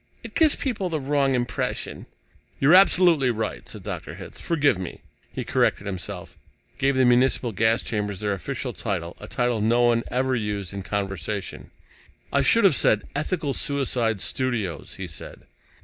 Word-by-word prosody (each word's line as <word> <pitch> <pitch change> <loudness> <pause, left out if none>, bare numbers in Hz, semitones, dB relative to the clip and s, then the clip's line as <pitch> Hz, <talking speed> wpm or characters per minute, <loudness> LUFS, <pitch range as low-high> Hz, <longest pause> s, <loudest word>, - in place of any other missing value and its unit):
"It - - -9
gives 315 -3 +5
people 210 -9 -2
the 160 -2 -1
wrong 140 -1 +1
impression." 120 0 -3 0.5
"You're 140 +5 +5
absolutely 175 -7 +6
right," 110 -2 -3
said - - -8
Dr. - - -6
Hitz. - - -10
"Forgive 145 - +1
me." 90 - -7 0.3
He - - -4
corrected 100 - +1
himself, 95 -1 -6 0.4
gave 135 -1 +2
the 130 0 +4
municipal 125 0 +3
gas 110 +3 +2
chambers 105 -4 -3
their 105 -1 -1
official 130 +5 -4
title, 90 -6 -3
a 105 - -9
title 120 -2 0
no 120 +3 +3
one 120 -1 +3
ever 130 +1 0
used 105 -4 -3
in 100 - -4
conversation. 100 0 -4 0.6
"I 140 - +4
should 215 - +4
have 195 - +6
said, 110 -5 +3
'Ethical 155 -1 -1
Suicide 125 -8 0
Studios,'" 110 - -2
he 95 - -5
said. 80 -5 -9
120 Hz, 160 wpm, -24 LUFS, 105-140 Hz, 0.6 s, absolutely